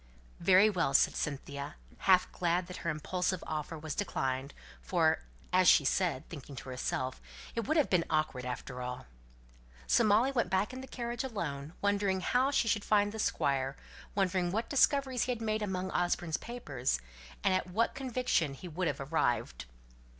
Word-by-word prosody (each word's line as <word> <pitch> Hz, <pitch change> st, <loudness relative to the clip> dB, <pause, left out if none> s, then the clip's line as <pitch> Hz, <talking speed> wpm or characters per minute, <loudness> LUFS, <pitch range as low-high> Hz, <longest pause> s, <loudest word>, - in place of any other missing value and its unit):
"Very 190 Hz, +3 st, +6 dB
well!" 165 Hz, -9 st, +1 dB
said -, -, +5 dB
Cynthia, 140 Hz, 0 st, -4 dB, 0.2 s
half 185 Hz, -1 st, +4 dB
glad 175 Hz, +1 st, 0 dB
that 180 Hz, +1 st, -8 dB
her 170 Hz, -, -3 dB
impulsive 180 Hz, +4 st, -1 dB
offer 155 Hz, +1 st, -4 dB
was 155 Hz, -1 st, -5 dB
declined; 135 Hz, -8 st, -2 dB, 0.3 s
for, 165 Hz, -3 st, +2 dB, 0.3 s
as 185 Hz, 0 st, +5 dB
she 145 Hz, -, +7 dB
said, 165 Hz, -2 st, +1 dB
thinking 145 Hz, -3 st, -9 dB
to 130 Hz, -, -8 dB
herself, 130 Hz, 0 st, -3 dB, 0.3 s
"It 230 Hz, -3 st, -3 dB
would 315 Hz, -, +2 dB
have 300 Hz, -, +4 dB
been 175 Hz, -3 st, +3 dB
awkward 155 Hz, -5 st, 0 dB
after 125 Hz, 0 st, -5 dB
all." 125 Hz, 0 st, -5 dB, 0.8 s
So 235 Hz, -, +4 dB
Molly 220 Hz, +5 st, +4 dB
went 235 Hz, -8 st, 0 dB
back 190 Hz, +6 st, +1 dB
in 260 Hz, -, -6 dB
the 265 Hz, -, -9 dB
carriage 240 Hz, -1 st, -4 dB
alone, 160 Hz, -, -4 dB
wondering 200 Hz, -2 st, +1 dB
how 250 Hz, +7 st, +2 dB
she 275 Hz, -4 st, +2 dB
should 210 Hz, -2 st, +1 dB
find 205 Hz, -1 st, +3 dB
the 220 Hz, -, -7 dB
Squire; 135 Hz, -8 st, 0 dB, 0.4 s
wondering 185 Hz, -2 st, +1 dB
what 220 Hz, +4 st, -2 dB
discoveries 275 Hz, -3 st, +3 dB
he 255 Hz, -, -1 dB
had 240 Hz, -, -2 dB
made 215 Hz, -1 st, -1 dB
among 190 Hz, -2 st, -2 dB
Osborne's 175 Hz, -2 st, 0 dB
papers, 145 Hz, -, -2 dB, 0.4 s
and 190 Hz, -, +3 dB
at 185 Hz, 0 st, 0 dB
what 220 Hz, +6 st, +1 dB
conviction 250 Hz, -, 0 dB
he 180 Hz, -, -9 dB
would 175 Hz, +2 st, -2 dB
have -, -, -2 dB
arrived. 120 Hz, -, 0 dB
180 Hz, 170 wpm, -32 LUFS, 145-215 Hz, 0.8 s, she